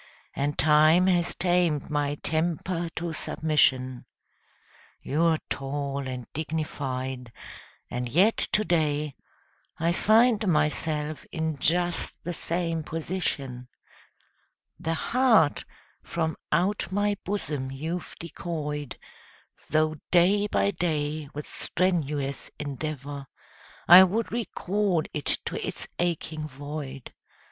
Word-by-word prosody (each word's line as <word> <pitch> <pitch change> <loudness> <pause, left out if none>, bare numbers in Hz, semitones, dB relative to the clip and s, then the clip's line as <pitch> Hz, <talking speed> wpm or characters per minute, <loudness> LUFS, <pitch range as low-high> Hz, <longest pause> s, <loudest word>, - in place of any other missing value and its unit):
And 145 +1 -1
time 155 +4 +5
has 175 -2 +2
tamed 175 -5 +1
my 145 -1 0
temper 170 +2 -1
to 170 0 -3
submission. 130 -6 +1 0.9
You're 160 +3 +2
tall 140 0 -3
and 125 -2 -5
dignified, 130 -5 -3 0.6
and 125 0 -3
yet 190 - +4
to 210 - +2
day 150 -4 +1 0.6
I 165 +1 +1
find 220 +3 +4
myself 150 -2 0
in 160 -3 -2
just 175 +4 0
the 175 - -3
same 165 0 -2
position. 150 -6 -3 1.1
The 165 0 -1
heart 225 - +3 0.4
from 160 -1 -2 0.2
out 180 +3 +1
my 205 +1 +1
bosom 150 -9 -3
you've 160 +6 -4
decoyed, 150 -5 -4 0.7
Though 155 0 +2
day 195 +4 +4
by 200 - +2
day 155 -4 -2
with 150 - -5
strenuous 150 -7 -1
endeavour 145 -1 -5 0.6
I 180 +2 +11
would 210 +5 0
recall 205 -6 0
it 150 -3 0
to - - -3
its - - -5
aching 160 -3 -1
void. 140 -1 -7
155 Hz, 105 wpm, -27 LUFS, 145-175 Hz, 1.1 s, I